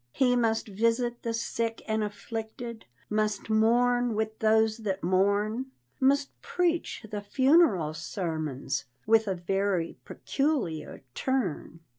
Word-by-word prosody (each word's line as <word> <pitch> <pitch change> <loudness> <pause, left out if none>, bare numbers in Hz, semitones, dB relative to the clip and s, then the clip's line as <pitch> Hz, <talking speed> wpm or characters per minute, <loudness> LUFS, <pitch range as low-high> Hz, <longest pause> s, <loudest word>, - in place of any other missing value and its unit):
He 250 -2 +3
must 225 -2 +1
visit 230 +4 0
the 230 - -2
sick 230 0 -2
and 220 -1 0
afflicted, 225 +3 -6 0.2
Must 215 0 -1
mourn 240 +2 +3
with 220 0 -2
those 220 0 +3
that 195 -4 -3
mourn, 200 +7 +1 0.3
Must 275 +1 +1
preach 345 -9 -1
the 205 -1 -3
"funeral 260 - +3
sermons" 155 -5 -3 0.2
With 220 0 +4
a 190 - 0
very 185 -1 -1
peculiar 245 - -2
turn. 230 - -2
220 Hz, 115 wpm, -28 LUFS, 195-240 Hz, 0.3 s, With